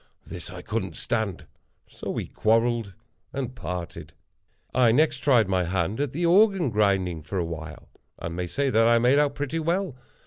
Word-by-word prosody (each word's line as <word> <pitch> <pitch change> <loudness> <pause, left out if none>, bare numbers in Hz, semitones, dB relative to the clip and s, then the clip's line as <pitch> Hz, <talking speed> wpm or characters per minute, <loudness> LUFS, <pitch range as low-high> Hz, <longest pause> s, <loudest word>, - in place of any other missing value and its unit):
This - - -7
I - - -9
couldn't - - -3
stand—so 110 -6 -5
we - - -2
quarrelled 115 -2 +1 0.4
and 130 -2 -4
parted. 90 -6 -6 0.6
I 125 -2 +4
next 155 +6 +3
tried 125 -8 +4
my 95 -2 +1
hand 95 +5 -1
at 145 -3 -1
the 170 +5 -1
Organ 190 - +4
Grinding 95 -5 +1
for 80 +6 -5
a 85 - 0
while, 80 -2 -8 0.3
and 85 0 -5
may 90 0 -3
say 140 +9 -1
that 115 0 +4
I 115 0 +5
made 125 +5 +4
out 145 -1 +1
pretty 145 +3 -2
well. 170 -1 -1
115 Hz, 170 wpm, -25 LUFS, 90-140 Hz, 0.6 s, I